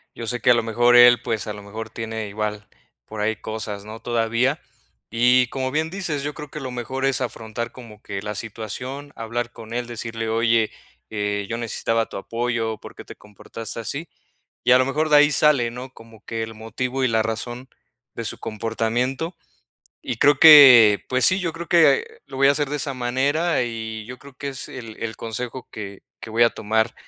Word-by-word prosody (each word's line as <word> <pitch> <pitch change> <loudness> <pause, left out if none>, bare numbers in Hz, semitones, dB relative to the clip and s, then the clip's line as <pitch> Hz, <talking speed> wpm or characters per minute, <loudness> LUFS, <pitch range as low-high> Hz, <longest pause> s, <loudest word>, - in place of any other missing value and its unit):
yo 115 - -6
sé 120 +2 -2
que 125 - +2
a - - +8
lo 115 -1 +1
mejor 120 +2 +3
él, 120 -1 +8
pues, 110 -3 -2
a - - -3
lo 105 - -9
mejor 110 +2 -8
tiene 110 -1 -5
igual 105 0 -4 0.4
por 110 -1 -8
ahí 110 +1 0
cosas, 105 -2 -6
¿no?, 110 +1 -9
todavía. 120 +4 0 0.5
Y 125 +1 +4
como 130 -1 -3
bien 155 +2 0
dices, 165 -6 -3
yo 145 0 -3
creo 150 -1 -9
que 150 - -7
lo 130 -1 -5
mejor 125 +2 -5
es 135 -1 +1
afrontar, 115 -1 -5
como 115 -4 -13
que 100 -1 -6
la 105 0 -4
situación, 125 +7 -6
hablar 120 +1 -3
con 115 -1 -11
él, 120 0 -2
decirle: 115 -1 -4
"Oye, 115 0 +2 0.4
eh, 105 -1 -2
yo 115 - -2
necesitaba 115 -1 -1
tu - - -11
apoyo, 115 +1 -2
por - - -12
qué - - -10
te - - -11
comportaste 110 +2 -8
así". 150 +8 -5 0.6
Y - - +3
a 125 - +8
lo 130 - +3
mejor 155 +3 -1
de 150 - +6
ahí 145 +1 +6
sale, 140 -6 +3
¿no? 130 +2 -9
Como 115 -1 -16
que 115 -1 -3
el 110 - -7
motivo 125 +4 -3
y 130 - +3
la 110 -1 +2
razón 120 +3 -4 0.5
de - - -4
su - - -4
comportamiento. 115 - -2 0.7
Y 125 -4 -4
creo 140 +3 +4
que, 130 -9 +9
pues 130 0 +2
sí, 185 +1 +3
yo 170 -3 -2
creo 170 0 -7
que 175 - +5 0.2
lo - - -11
voy 135 0 +5
a - - +7
hacer 145 -1 -1
de 150 - -2
esa 140 -1 -2
manera, 135 +6 0
y 110 -2 -5
yo 125 - -8
creo 140 -1 -14
que 140 - -6
es 135 - -6
el 115 -4 -9
el 115 -1 -4
consejo 120 +3 -6
que 100 -2 -8 0.2
que - - -9
voy 115 - 0
a 115 - +5
tomar, 110 +2 0
120 Hz, 210 wpm, -22 LUFS, 110-130 Hz, 0.7 s, que